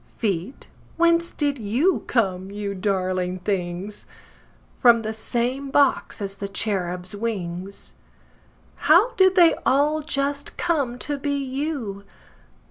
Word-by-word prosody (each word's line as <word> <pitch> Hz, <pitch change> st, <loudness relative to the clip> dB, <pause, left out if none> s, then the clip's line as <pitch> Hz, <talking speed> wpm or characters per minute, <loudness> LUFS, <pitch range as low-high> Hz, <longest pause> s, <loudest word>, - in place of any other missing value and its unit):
Feet, 200 Hz, +2 st, -3 dB, 0.3 s
whence 335 Hz, 0 st, +3 dB
did 285 Hz, -3 st, -1 dB
you 245 Hz, -, +1 dB
come, 190 Hz, -5 st, 0 dB
you 200 Hz, 0 st, -4 dB
darling 185 Hz, -2 st, -1 dB
things? 185 Hz, +1 st, -4 dB, 0.7 s
From 235 Hz, -2 st, +5 dB
the 220 Hz, 0 st, -3 dB
same 245 Hz, +5 st, -2 dB
box 275 Hz, -6 st, +2 dB
as 195 Hz, 0 st, -5 dB
the 200 Hz, -, -4 dB
cherubs' 190 Hz, -2 st, -2 dB
wings. 195 Hz, -3 st, -5 dB, 1.0 s
How 370 Hz, +11 st, +6 dB
did 375 Hz, -3 st, +4 dB
they 345 Hz, -3 st, +7 dB
all 295 Hz, +3 st, +2 dB
just 285 Hz, -1 st, -2 dB
come 285 Hz, -8 st, 0 dB
to 290 Hz, +2 st, -4 dB
be 285 Hz, 0 st, -1 dB
you? 265 Hz, -7 st, -3 dB
230 Hz, 120 wpm, -23 LUFS, 195-285 Hz, 1.0 s, they